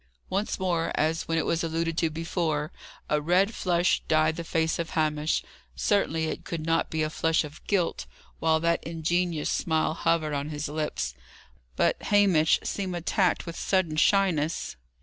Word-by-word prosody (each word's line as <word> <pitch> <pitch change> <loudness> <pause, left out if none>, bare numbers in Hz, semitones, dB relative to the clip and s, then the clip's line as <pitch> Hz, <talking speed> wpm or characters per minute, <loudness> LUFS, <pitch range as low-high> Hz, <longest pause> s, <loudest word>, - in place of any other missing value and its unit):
Once 200 +3 -1
more, 175 -3 0
as 160 +2 0
when 165 +1 0
it 160 - +1
was 165 0 0
alluded 165 0 -1
to 165 -1 +1
before, 160 -1 -2 0.4
a 150 0 +1
red 185 +7 +2
flush 175 -2 +1
dyed 155 0 +3
the 170 - -5
face 160 0 0
of 165 - -2
Hamish. 155 0 +1 0.3
Certainly, 165 - +1
it 155 - -4
could 160 -2 -5
not 165 0 +1
be 160 -1 -1
a 155 - -1
flush 160 +1 +1
of 150 0 -10
guilt, 185 -5 0 0.3
while 160 0 +3
that 170 0 +1
ingenuous 165 0 -1
smile 160 -1 +1
hovered 165 -2 0
on 145 +1 -2
his 150 0 -4
lips. 150 - -3 0.6
But - - +1
Hamish 190 -7 +4
seemed 190 -3 -3
attacked 180 +2 +1
with 170 -1 -6
sudden 185 -5 0
shyness. 165 -3 +2
165 Hz, 165 wpm, -27 LUFS, 155-175 Hz, 0.6 s, Hamish